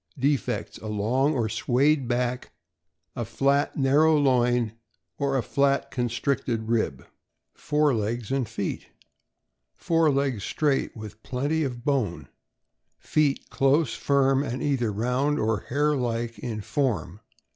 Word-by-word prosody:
Defects: 140 +1 -1
A 110 - -8
long 120 +8 +1
or 115 -4 0
swayed 130 +5 +1
back, 125 0 -2 0.6
a 120 - -2
fiat, 140 +6 +1
narrow 150 +3 +4
loin, 125 -4 +2 0.5
or 140 -1 +1
a 125 - 0
flat, 140 +4 +1
constricted 120 -1 -1
rib. 115 -2 -1 0.5
Fore 150 -1 +1
legs 115 +2 -2
and 135 -5 0
feet. 110 -4 -4 0.5
— - - -55
Fore 165 -2 +2
legs 135 -7 0
straight, 145 -5 0
with 110 0 -9
plenty 145 +5 -1
of 125 -3 -5
bone. 130 -12 -1 0.7
Feet 150 -3 0
close, 135 0 +2
iirm, 135 -1 +2
and 130 -2 -4
either 130 -6 0
round 125 +7 0
or 110 -6 -1
hare 150 +3 +2
like 120 -2 -2
in 110 -3 -4
form. 105 -7 -2
130 Hz, 130 wpm, -26 LUFS, 115-140 Hz, 0.7 s, narrow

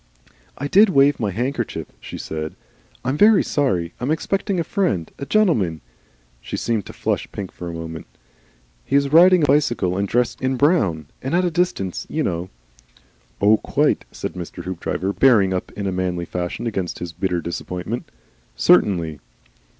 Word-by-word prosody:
"I 145 - -3
DID 205 +7 +6
wave 140 -4 +4
my 105 - 0
handkerchief," 125 +8 -2
she - - -8
said. 80 0 -5 0.5
"I'm 130 +3 0
very 210 -1 +6
sorry. 90 - 0
I - - -7
am 130 - -1
expecting 195 +4 -1
a - - +1
friend, 175 - -1
a 140 - -5
gentleman," 120 - +2 0.6
she - - -5
seemed 110 -4 -1
to - - -9
flush - - -2
pink 95 -3 -6
for 90 - -7
a - - -6
minute. 80 0 -7 0.8
"He - - -2
is 140 0 +2
riding 180 +1 +7
a - - +6
bicycle 120 -11 +2
and 100 +1 0
dressed 120 +2 0
in 130 0 +1
in - - -3
brown; 110 - +2 0.2
and 135 +6 -1
at 180 +1 +3
a 175 - 0
distance, 165 - -1
you 155 - -1
know 90 -3 -2 0.5
" - - -33
"Oh, 105 +2 +6
quite!" - - 0
said - - -5
Mr. 90 0 -7
Hoopdriver, 95 +2 -3
bearing 105 -8 +4
up 90 - -3
in 100 -2 -3
manly 90 -2 -1
fashion 90 +5 -4
against 95 -6 -3
his 85 -1 -6
bitter 90 +1 -1
disappointment. 90 +6 -5 0.5
"Certainly." 85 -7 +3
105 Hz, 175 wpm, -21 LUFS, 90-145 Hz, 0.8 s, riding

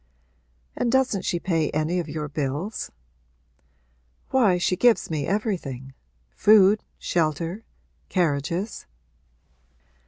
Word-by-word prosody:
'And 240 - 0
doesn't 260 -6 +1
she 175 - 0
pay 165 -4 0
any 160 +4 0
of 165 -3 -4
your 150 0 -4
bills?' 150 +8 -3 1.4
'Why, 220 -9 +4
she 180 +1 +1
gives 235 -2 +3
me 150 -3 -2
everything 165 - -3 0.4
food, 210 - +5
shelter, 170 +5 -1 0.4
carriages.' 170 +4 -1
175 Hz, 95 wpm, -24 LUFS, 155-210 Hz, 1.4 s, food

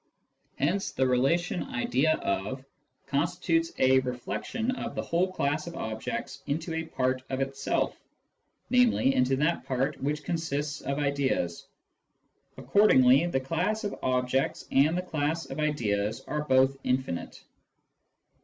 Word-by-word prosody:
Hence 180 +8 0
the 130 - +1
relation 140 +8 +1
" - - -9
idea 135 +5 +2
of" 105 +8 -2 0.4
constitutes 165 +3 0
a 130 0 +5
reflexion 130 - -3
of 255 - -5
the - - -1
whole 180 +3 0
class 150 -2 -1
of 170 - -7
objects 135 +3 -4
into 160 +3 -2
a 160 0 -2
part 130 -4 -1
of 130 0 -2
itself, 135 0 -1 0.8
namely, 245 - +4
into 130 +1 +2
that 150 +5 0
part 135 +3 -1
which 150 +2 -1
consists 150 -3 -2
of 140 0 -2
ideas. 140 - -1 0.9
Accordingly, 140 -7 +5
the 150 -6 0
class 180 - -1
of 205 - -2
objects 130 +1 0
and 150 +5 +4
the 180 - -1
class 160 -1 -1
of - - -5
ideas 110 -8 0
are 150 0 -3
both 130 0 +3
infinite. 125 -9 -2
140 Hz, 135 wpm, -28 LUFS, 130-165 Hz, 0.9 s, a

